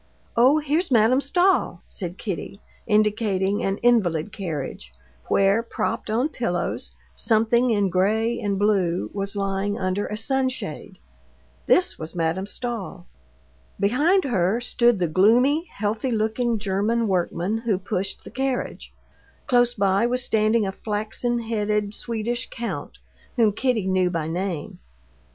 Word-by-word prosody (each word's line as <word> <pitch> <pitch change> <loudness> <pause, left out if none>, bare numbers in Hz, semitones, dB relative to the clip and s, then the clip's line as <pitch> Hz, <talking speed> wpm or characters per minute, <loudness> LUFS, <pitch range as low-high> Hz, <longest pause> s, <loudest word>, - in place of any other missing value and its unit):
"Oh, 255 +6 +5
here's 310 +4 0
Madame 240 +2 +4
Stahl," 360 +7 +1
said 180 -2 -5
Kitty, 200 -1 -5 0.3
indicating 210 -2 +1
an 195 0 -1
invalid 205 -7 +2
carriage, 145 - -5 0.4
where, 195 +3 +3
propped 230 - -3
on 240 +7 +1
pillows, 180 - -3 0.2
something 235 +2 +2
in 205 -4 +2
gray 220 +6 +1
and 200 -1 -1
blue 190 -4 +1
was 200 0 -3
lying 195 0 -1
under 185 +2 -1
a 210 - -4
sunshade. 260 +3 -2 0.7
This 365 0 +3
was 160 +3 -7
Madame 170 +3 -1
Stahl. 215 -6 -5 0.7
Behind 290 - +3
her 210 -4 +1
stood 240 -1 +2
the 180 -2 0
gloomy, 245 - +3
healthy 215 +4 -2
looking 225 +1 0
German 210 +3 0
workman 185 +2 -1
who 225 -4 0
pushed 190 +1 -3
the - - -11
carriage. 265 -1 -3 0.5
Close 245 -1 +3
by 200 +1 +2
was 250 +1 0
standing 220 -1 +2
a 195 - -2
flaxen 220 +4 -2
headed 210 -2 -1
Swedish 235 +2 -3
count, 235 0 -5 0.4
whom 225 -4 +4
Kitty 225 -1 0
knew 185 -1 +2
by 165 -3 -2
name. 175 -1 -4
215 Hz, 130 wpm, -24 LUFS, 195-240 Hz, 0.7 s, Oh